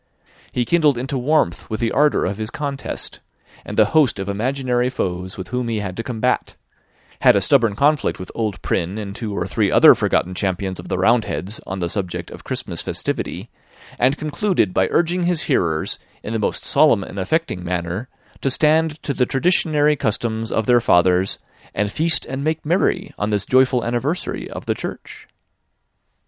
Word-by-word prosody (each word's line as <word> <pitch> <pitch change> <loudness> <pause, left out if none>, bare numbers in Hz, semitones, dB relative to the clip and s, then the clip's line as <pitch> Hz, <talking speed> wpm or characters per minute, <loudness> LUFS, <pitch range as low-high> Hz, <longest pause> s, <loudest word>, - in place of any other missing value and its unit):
He 120 - 0
kindled 155 -5 +3
into 130 +3 -3
warmth 130 - 0
with 110 - -3
the 115 -1 0
ardour 150 +1 +3
of 100 +3 -3
his 110 0 -3
contest, 140 0 -4 0.4
and - - -7
the - - +6
host 150 -9 +4
of 95 0 -4
imaginary 125 +3 0
foes 95 -5 -3
with 95 - -7
whom 125 -1 -2
he 115 -1 -1
had 95 -3 -4
to - - -3
combat; 115 -1 -1 0.6
had - - +6
a - - +4
stubborn 115 -1 +3
conflict 145 +4 +2
with 95 - -8
old 110 -4 -2
Prynne 90 +4 -1
and 100 -2 -6
two 105 -4 -4
or - - -1
three - - 0
other - - +8
forgotten 90 - 0
champions 95 0 -2
of - - -9
the - - -2
Round 115 +5 +3
heads, 100 +4 -4
on 95 - -4
the 85 -2 -2
subject 90 0 -4
of - - -10
Christmas - - -4
festivity; - - -4 0.5
and 130 +4 +3
concluded 155 - 0
by 95 - +2
urging 175 +1 +1
his 175 -3 +1
hearers, 80 -3 0 0.2
in 110 - -5
the 110 - 0
most 105 - -1
solemn - - +4
and 100 - -7
affecting 100 - -1
manner, 90 +6 -3 0.3
to 135 - +1
stand 155 +3 +2
to 140 - -1
the 125 -2 +1
traditionary 150 0 +2
customs 110 -2 -2
of 110 - 0
their 120 +1 +4
fathers, 90 0 +3 0.4
and 105 0 0
feast 160 +5 +2
and 130 +1 -4
make 155 +1 -1
merry 180 +3 0
on 105 - -1
this 105 -1 0
joyful 130 -1 +3
anniversary 125 +9 -2
of - - -8
the - - +1
Church. - - -8
120 Hz, 185 wpm, -20 LUFS, 100-145 Hz, 0.6 s, other